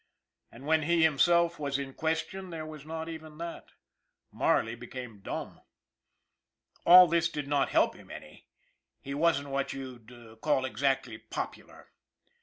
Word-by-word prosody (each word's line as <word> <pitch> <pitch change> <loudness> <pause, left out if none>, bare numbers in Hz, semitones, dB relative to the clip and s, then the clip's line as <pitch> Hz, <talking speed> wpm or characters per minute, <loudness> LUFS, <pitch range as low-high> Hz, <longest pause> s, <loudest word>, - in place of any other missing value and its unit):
And 125 +4 -12
when 160 +1 +3
he 165 +1 +3
him 150 -4 +1
self 170 +1 +4
was 140 -2 -1
in 135 -1 -5
question 160 +5 -2
there 160 -2 -6
was 155 -1 -10
not 160 0 -5
even 160 -2 -9
that 170 +1 -8 0.6
Marley 115 0 +1
became 120 -2 -8
dumb. - - -6 1.3
All 180 +1 +11
this 170 0 +1
did 150 -4 -5
not 140 -2 +1
help - - +3
him - - -16
any - - -11 0.5
he 140 - -7
wasn't 145 -2 +1
what 135 0 -2
you'd 120 -3 -10
call 135 -4 +2
exactly 130 -3 -1
popular! - - -7
145 Hz, 145 wpm, -30 LUFS, 130-165 Hz, 1.3 s, All